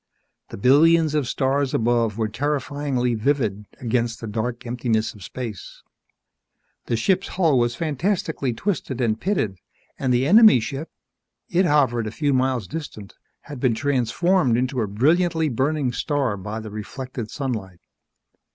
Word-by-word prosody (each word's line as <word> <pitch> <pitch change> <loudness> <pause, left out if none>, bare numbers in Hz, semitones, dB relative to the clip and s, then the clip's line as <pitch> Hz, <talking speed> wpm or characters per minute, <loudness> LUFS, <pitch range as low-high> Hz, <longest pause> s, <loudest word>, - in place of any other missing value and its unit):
The - - -8
billions 155 +7 +4
of 150 -5 0
stars 135 +1 0
above 115 -2 +1
were 110 -1 0
terrifyingly 140 0 -1
vivid 110 -4 0
against 120 -1 -1
the - - -6
dark 115 +3 -3
emptiness 115 -2 -1
of 105 - -13
space. 115 -2 -7 1.0
The 115 - 0
ship's 185 - +1
hull 160 -8 +2
was 120 0 +1
fantastically 160 - -1
twisted 135 - -3
and 115 -3 0
pitted, 135 - -1 0.4
and 130 - 0
the 125 +1 +2
enemy 215 - +7
ship 135 +7 -5 0.6
it 180 +1 +2
hovered 130 -7 +2
a - - -4
few 145 +3 0
miles 130 -5 0
distant 110 - -7 0.3
had 145 -3 -9
been 120 -2 +2
transformed 140 +2 +1
into 130 0 -1
a 110 - -1
brilliantly 160 - +2
burning 135 +2 0
star 135 -3 -1
by 105 +3 -5
the 110 -1 -8
reflected 115 +2 -6
sunlight. 110 -11 -5
130 Hz, 140 wpm, -23 LUFS, 115-145 Hz, 1.0 s, enemy